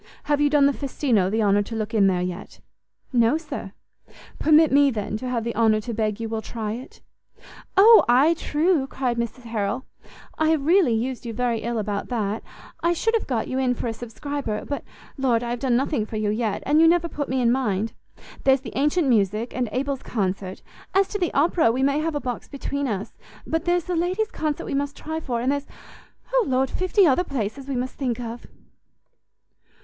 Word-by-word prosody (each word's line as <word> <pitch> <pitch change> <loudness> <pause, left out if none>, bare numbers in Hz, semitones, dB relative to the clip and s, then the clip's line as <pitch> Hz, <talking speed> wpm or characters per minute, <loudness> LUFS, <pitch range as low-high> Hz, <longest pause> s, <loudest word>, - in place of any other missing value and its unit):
Have 290 0 +1
you 295 - +4
done 290 -1 +4
the 280 - +5
Festino 250 -8 0
the 220 +2 +1
honour 205 0 +3
to 225 +3 -5
look 220 +1 -3
in 205 -3 +4
there 180 -2 +1
yet?" 180 +1 -6 0.5
"No, 240 +4 +4
sir." 295 -10 -7 0.7
"Permit 310 0 +5
me, 285 +1 +5
then, 215 -4 -3
to 255 +3 -5
have 235 -2 -1
the 235 0 -3
honour 220 -2 +3
to 235 +2 -5
beg 215 -1 -1
you 225 - -3
will 220 0 -3
try 220 -2 -4
it." 245 +4 -8 0.8
"O, 440 +3 +8
ay, 270 +7 +5
true," 315 -2 +1
cried 255 -3 -2
Mrs 235 +2 -4
Harrel; 225 +2 -2 0.5
"I 315 0 +3
have 310 -3 +1
really 330 - +4
used 250 +3 -2
you 235 -2 -5
very 240 0 0
ill 235 +2 -3
about 205 -1 -2
that; 220 -3 -2 0.4
I 340 +1 +2
should 450 +7 0
have 455 - 0
got 240 -4 -1
you 260 - -2
in 250 -1 +1
for - - -5
a 230 - -1
subscriber: 240 0 -5
but 285 - -4 0.4
Lord, 245 -3 +2
I 235 - -3
have 240 - -3
done 255 -2 +1
nothing 250 -3 0
for 215 - -5
you 210 -1 0
yet, 220 -1 -2
and 300 +3 +4
you 330 - +7
never 340 0 +3
put 290 -4 -4
me 260 +1 0
in 235 -2 +3
mind. 225 -4 0 0.5
There's 265 -1 +4
the 245 - -9
ancient 295 +4 +2
music, 215 0 +1
and 245 -2 -1
Abel's 270 +1 -2
concert; 190 -3 -3 0.3
as 390 0 +4
to 410 - -3
the 350 -3 0
opera, 315 -3 +3
we 255 +3 -1
may 280 +2 +2
have 320 0 -2
a - - 0
box 250 -3 -5
between 280 0 -3
us; 205 -4 -4 0.3
but 325 +1 -2
there's 350 0 +2
the 360 - -3
ladies' 370 +6 0
concert 305 -2 -2
we - - -4
must 285 +1 -2
try 315 +1 -4
for; 240 -6 -3
and 255 +3 +1
there's 285 0 -2 0.7
O - - +3
Lord, 260 0 +1
fifty 370 +2 +3
other 305 +3 +3
places 265 - -4
we 275 - -2
must 250 +1 -2
think 250 -4 -2
of!" 235 0 -7
255 Hz, 210 wpm, -24 LUFS, 225-295 Hz, 0.8 s, O